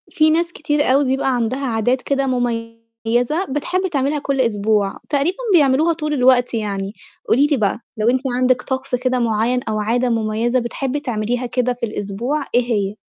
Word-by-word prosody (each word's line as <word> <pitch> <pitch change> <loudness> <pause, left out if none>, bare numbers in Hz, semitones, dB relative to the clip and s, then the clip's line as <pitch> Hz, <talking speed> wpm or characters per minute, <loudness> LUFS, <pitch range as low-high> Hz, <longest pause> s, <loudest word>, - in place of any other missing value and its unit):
في 310 0 +3
ناس 340 +2 +1
كتير 300 -1 -1
أوي 275 +3 +3
بيبقى 265 0 +1
عندها 245 +4 -1
عادات 245 +2 0
كده 275 0 0
مُميّزة 230 +4 -2
بتحب 355 +7 -1
تعملها 285 +1 0
كل 275 -2 0
أسبوع، 210 -3 +1
تقريبًا 295 +5 0 0.2
بيعملوها 305 +1 +4
طول 305 -2 -3
الوقت 250 -2 +3
يعني، 200 -3 -3 0.4
قولي 275 +5 +4
لي 295 -2 +1
بقى، 210 -1 0 0.2
لو 215 +2 +2
أنتِ 255 +1 +2
عندِك 255 0 +2
طقس 260 -1 -2
كده 255 0 0
معيّن 230 +2 +1
أو 215 0 -1
عادة 240 +4 +1
مُميّزة 225 +2 0
بتحبّي 260 +3 -3
تعمليها 245 -2 -2
كده 250 +1 0
في 245 -1 -3
الأسبوع 230 +7 -3
إيه 245 - +5
هي؟ 200 -2 0
250 Hz, 170 wpm, -19 LUFS, 230-275 Hz, 0.4 s, إيه